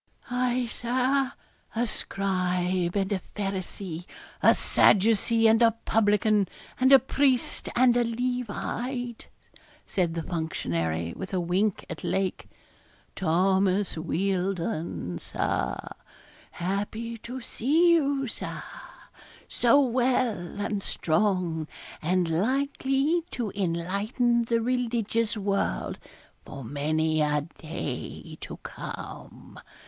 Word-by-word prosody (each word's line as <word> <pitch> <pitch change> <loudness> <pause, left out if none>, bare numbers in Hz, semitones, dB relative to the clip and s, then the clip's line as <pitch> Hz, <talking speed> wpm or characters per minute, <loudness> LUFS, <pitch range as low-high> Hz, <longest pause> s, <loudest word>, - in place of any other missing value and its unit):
'Aye, 250 0 +1
Sir, 255 +3 0 0.4
a 235 +2 +2
scribe 185 -4 0
and 195 0 0
a 190 - -1
Pharisee, 190 -3 -4 0.3
a - - +6
Sadducee 225 +2 +4
and 220 +1 +5
a 230 -1 +5
publican, 210 -2 +3 0.3
and 260 +1 +4
a 270 - +11
priest, 265 -1 +1
and 245 -1 +5
a 245 - +4
Levite,' 245 +1 -3 0.6
said 175 -3 0
the 165 - -2
functionary, 85 - -2
with 190 0 -5
a - - +2
wink 185 +4 0
at 165 - -7
Lake. 190 -1 -1 0.7
'Thomas 190 +2 +2
Wealdon, 175 - -2
Sir; 60 0 -1 0.7
happy 205 +5 -3
to 250 +4 -6
see 310 +9 +3
you, 280 -4 +2
Sir, 235 - -5 0.8
so 245 +4 +4
well 245 -8 +1
and 205 0 -1
strong, 175 -4 0 0.3
and 180 +2 +1
likely 270 - +1
to 230 - -3
enlighten 200 +7 0
the 230 0 +1
religious 230 -2 0
world 195 - -1 0.4
for 135 - -8
many 155 +5 0
a 150 0 +2 0.2
day 155 -5 -5
to - - -7
come. - - -8
205 Hz, 100 wpm, -27 LUFS, 175-245 Hz, 0.8 s, a